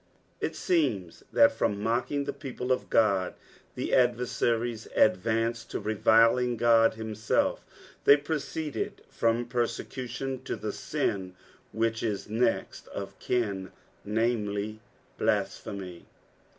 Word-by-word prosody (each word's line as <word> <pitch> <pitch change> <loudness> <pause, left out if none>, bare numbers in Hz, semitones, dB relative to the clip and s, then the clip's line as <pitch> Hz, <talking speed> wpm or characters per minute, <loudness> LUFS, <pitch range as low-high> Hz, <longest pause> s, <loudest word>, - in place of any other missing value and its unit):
It - - -2
seems 120 - 0
that 285 0 +6
from 105 - 0
mockin;; 120 +6 0
the 140 - -3
people 130 -2 -5
of 130 - 0
God, 100 -5 +2 0.4
the - - -3
adversaries 120 -2 +1
advanced 115 +3 +2
to - - -3
reviling 115 +3 +3
Ood 115 -1 +5
him 110 -1 -5
self, 110 +1 +1 0.4
they 140 - +8
proceeded 150 0 -3
from 115 +1 +1
persecution 125 +2 -3
to - - -2
the - - -4
sin 95 -2 -2 0.4
which 115 0 0
is 105 -4 -2
next 115 +2 -1
of 100 0 -7
kin, 100 -7 -1 0.3
namely 105 -1 -1 0.4
blasphemy. 95 -4 -2
115 Hz, 110 wpm, -28 LUFS, 105-125 Hz, 0.4 s, they